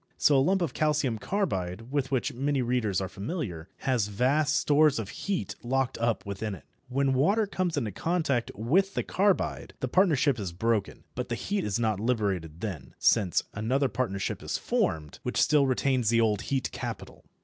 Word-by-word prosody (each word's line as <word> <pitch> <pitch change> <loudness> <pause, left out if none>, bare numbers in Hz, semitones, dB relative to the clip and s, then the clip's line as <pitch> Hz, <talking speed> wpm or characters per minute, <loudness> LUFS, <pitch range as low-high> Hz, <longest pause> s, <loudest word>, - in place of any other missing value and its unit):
So 145 - +4
a 135 - +5
lump 185 +5 +2
of 150 -7 -2
calcium 150 -7 +1
carbide, 105 - -2
with 140 -2 0
which 130 -4 0
many 135 +1 0
readers 120 -6 0
are 95 - -2
familiar, 100 - -5
has 125 -6 +1
vast 140 +8 +2
stores 150 0 +4
of 110 -4 -4
heat 200 -2 -3
locked 130 +1 0
up 115 -1 0
within 100 +1 -4
it. - - -14 0.3
When 135 +1 +1
water 200 +12 +3
comes 185 -5 -2
into 115 -7 -1
contact 140 - 0
with 175 - +1
the - - 0
carbide 200 0 0
the 130 - -1
partnership 145 - +3
is 95 -4 -4
broken, 110 +2 -1
but - - -4
the - - -1
heat 200 0 -2
is 100 - -1
not 110 -4 0
liberated 100 -8 -1
then, 80 - -6
since 100 -7 +3
another 130 +6 +1
partnership 100 -7 -2
is - - -2
formed, 75 -2 -1
which - - -2
still 150 -2 +4
retains 130 -3 +1
the 115 0 +3
old 105 -3 +2
heat 135 -2 0
capital. - - -6
125 Hz, 180 wpm, -28 LUFS, 105-145 Hz, 0.3 s, a